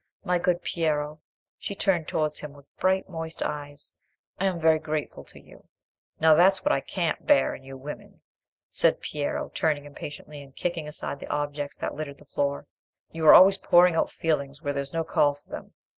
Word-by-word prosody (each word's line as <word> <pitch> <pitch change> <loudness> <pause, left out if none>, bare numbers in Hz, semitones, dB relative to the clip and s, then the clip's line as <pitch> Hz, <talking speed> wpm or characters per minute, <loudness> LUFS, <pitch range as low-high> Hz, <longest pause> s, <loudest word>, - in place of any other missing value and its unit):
My 180 -2 +1
good 175 0 0
Piero,"—she 155 +4 -4
turned 180 -6 +1
towards 155 -1 -1
him 150 -1 -8
with 140 -1 -17
bright 190 +1 +1
moist 160 -2 -5
eyes—"I 145 +5 -7
am 185 -3 0
very 160 -1 +4
grateful 155 -1 -4
to - - -13
you." - - -18 0.5
"Now 160 0 +6
that's 185 +4 +4
what - - +3
I - - +2
can't 170 +1 -3
bear 290 -1 +4
in - - -9
you 135 0 -10
women," 145 +3 -10 0.5
said - - +4
Piero, 145 -1 -3
turning 150 -2 0
impatiently, 145 0 -9
and 135 -1 -15
kicking 170 -3 -3
aside 150 -2 -5
the - - -8
objects 145 -1 -3
that - - -3
littered 145 -2 -6
the 150 - -18
floor—"you 145 +3 -4
are - - +11
always 195 +1 +7
pouring 175 0 +5
out 165 - +1
feelings 145 -3 -2
where 145 -3 -3
there's 140 0 -3
no 165 0 -1
call 145 -2 +2
for 145 - -26
them. - - -8
155 Hz, 180 wpm, -26 LUFS, 145-170 Hz, 0.5 s, are